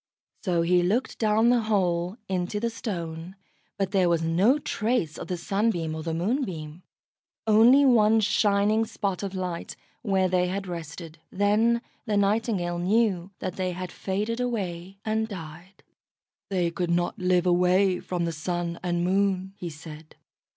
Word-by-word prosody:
So 175 -4 +1
he 180 +1 +3
looked 210 +9 0
down 220 +2 +3
the 245 - +4
hole, 185 -3 0
into 185 +2 -2
the 230 +2 -1
Stone, 170 -5 -5 0.4
but 195 -1 -1
there 190 -3 +3
was 170 -1 +1
no 185 - +3
trace 225 - -1
of - - -6
the 180 - -2
Sunbeam 175 -3 -1
or 160 - -4
the 165 +1 -3
Moonbeam 175 - -2 0.6
only 230 +6 +6
one 225 -3 +5
shining 210 +1 +2
spot 200 -4 -3
of 195 -1 -4
light, 180 -2 -4 0.3
where 190 -4 +1
they 180 0 +1
had 195 +2 -3
rested. 165 -2 -7
Then 220 +4 +2 0.2
the 210 -2 +1
Nightingale 200 -4 0
knew 190 -1 +1
that 185 +1 -4
they 185 -1 -1
had 180 0 -6
faded 210 +5 -3
away 195 -6 -3
and 220 0 0
died. 175 -1 -10 0.7
"They 180 -3 0
could 175 0 -2
not 175 0 0
live 180 -1 +2
away 180 +1 +3
from 175 -2 -3
the 170 - -1
Sun 170 +1 -3
and 175 -1 -1
Moon," 190 0 +1
he 175 -3 -6
said. 155 0 -11
185 Hz, 155 wpm, -26 LUFS, 175-210 Hz, 0.7 s, only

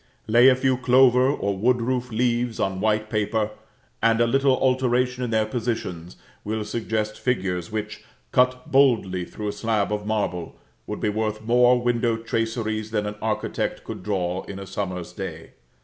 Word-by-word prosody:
Lay 120 +4 +6
a 130 - +5
few 130 0 +1
clover 125 0 +5
or 100 -8 -1
wood 120 +6 +2
roof 125 +1 -2
leaves 120 0 0
on 95 -1 -1
white 110 0 +1
paper, 105 0 -1 0.5
and 115 0 +3
a 120 - +5
little 135 +2 +3
alteration 125 -1 +1
in 120 - -2
their 110 -1 +2
positions 110 -7 -4 0.3
will 110 0 -3
suggest 110 -1 -2
figures 95 -8 -1
which, 105 -1 -5 0.3
cut 125 0 +1
boldly 115 -10 +3
through 105 +2 -5
a - - -3
slab 105 -1 0
of 105 0 -3
marble, 90 -6 -2 0.3
would - - -5
be 105 - +1
worth 110 0 -2
more 125 +2 +4
window 120 -1 +1
traceries 115 -1 -2
than 105 -2 -1
an 105 - -3
architect 110 -1 -2
could - - -7
draw 90 -2 -1
in 100 - -7
a 100 - -7
summer's 90 -3 -5
day. - - -7
110 Hz, 165 wpm, -24 LUFS, 105-125 Hz, 0.5 s, Lay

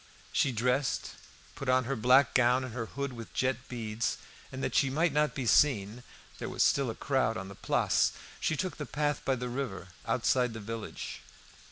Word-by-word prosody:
She 135 - +3
dressed, 125 +4 0 0.4
put 140 -3 -5
on 130 0 +4
her 135 +3 -2
black 125 +4 +5
gown, 125 +1 +4
and 130 -3 -6
her 115 -2 -3
hood 140 +1 -4
with 115 -2 -9
jet 130 -2 +1
beads, 115 -2 -2 0.3
and 130 +1 -5
that - - -1
she 135 - +3
might 155 +3 +1
not 150 0 +2
be 130 - -2
seen 115 -3 +3 0.4
(there - - -4
was - - +1
still 140 -3 +3
a 115 - -4
crowd 130 -4 0
on 95 +1 -6
the - - -8
Place), - - +2 0.3
she 155 - 0
took 185 +5 -2
the 150 - -5
path 145 +1 -1
by 135 - +1
the 125 0 -4
river, 120 -8 -4 0.2
outside 125 0 +2
the 110 - -6
village. 110 +1 -6
130 Hz, 195 wpm, -30 LUFS, 115-140 Hz, 0.4 s, black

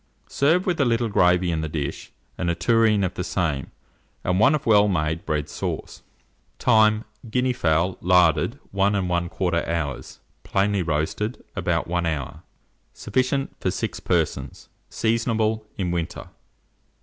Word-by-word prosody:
Serve 165 +6 +2
with 175 -5 0
a - - +5
little 115 -2 +1
gravy 90 -2 +3
in 80 -1 -1
the 80 - -3
dish, 75 -3 -4 0.2
and 90 - -2
a 85 - +1
tureen 110 +2 +3
of 95 - -1
the 90 - -4
same, 80 -7 -2 0.5
and 90 +1 +1
one 135 +8 +5
of 150 - -4
well 105 -2 +5
made 80 -3 -1
bread 75 -2 -1
sauce. - - -5 0.6
Time. 110 -2 +4 0.2
Guinea 125 +2 +1
fowl, 85 -3 +1
larded, 90 -3 +3
1 100 +1 +2
1/4 90 -2 -1
hour; 75 -6 -2 0.4
plainly 100 0 0
roasted, 80 +8 -2
about - - 0
1 85 0 -1
hour. 75 -5 -4 0.5
Sufficient 130 +1 -1
for - - 0
6 - - -3
persons. 70 -2 -2 0.2
Seasonable 110 -1 0
in 90 -3 -1
winter. 85 -1 -4
90 Hz, 140 wpm, -24 LUFS, 85-110 Hz, 0.6 s, a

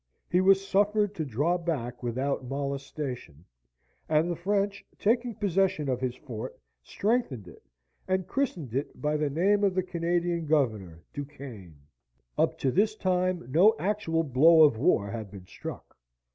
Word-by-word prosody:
He 180 - +4
was 195 +1 +4
suffered 205 +1 +2
to 165 - -3
draw 150 +7 0
back 135 -8 -3
without 130 +3 -2
molestation; 140 - -5 0.6
and 160 +3 +2
the - - -2
French, 200 +3 -1
taking 235 +1 +1
possession 190 -5 +1
of 125 -1 -1
his 125 -1 -2
fort, 115 -4 -7 0.2
strengthened 170 - -1
it, 85 - -14 0.5
and 185 -1 0
christened 175 - -2
it 135 +3 -3
by 150 0 0
the 150 -1 0
name 195 +8 +2
of 195 -2 +2
the 185 - +1
Canadian 170 -1 -1
governor, 110 - 0
Du 145 - -4
Quesne. 125 - -11 0.6
Up - - +1
to 130 - 0
this 210 +6 +2
time 185 - 0
no 195 +9 +6
actual 190 -5 0
blow 160 +4 +6
of 145 -6 +5
war 100 -2 +2
had 110 -3 -5
been 95 -2 -11
struck. - - -9
160 Hz, 155 wpm, -28 LUFS, 130-190 Hz, 0.6 s, no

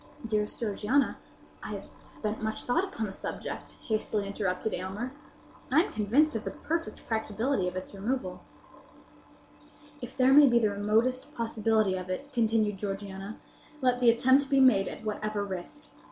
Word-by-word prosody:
"Dearest 210 -2 -1
Georgiana, 230 +5 +1 0.4
I - - -5
have - - -5 0.2
spent 215 0 -5
much 220 0 -3
thought 290 +9 +1
upon 375 - -3
the 195 - -6
subject," - - -6
hastily 215 -2 -1
interrupted 200 +1 -2
Aylmer. 195 +7 -4 0.6
"I 300 +5 +6
am - - -6
convinced 235 +8 +3
of 225 - -2
the - - -3
perfect 330 +1 -4
practicability 220 -1 0
of 180 - -4
its 185 +2 -5
removal." 200 -2 -3 1.6
"If 245 +1 -8
there 260 0 +5
be 275 -4 +7
the 215 -3 +3
remotest 225 +8 0
possibility 220 -3 +1
of 185 0 -6
it," 280 +10 -5
continued 220 -4 +2
Georgiana, 195 0 -5 0.4
"let 250 -2 +2
the 245 -2 +6
attempt 260 +4 +4
be 275 -1 +4
made 255 -7 +5
at - - -7
whatever 215 -1 -2
risk. 200 +11 -7
220 Hz, 155 wpm, -29 LUFS, 205-255 Hz, 1.6 s, be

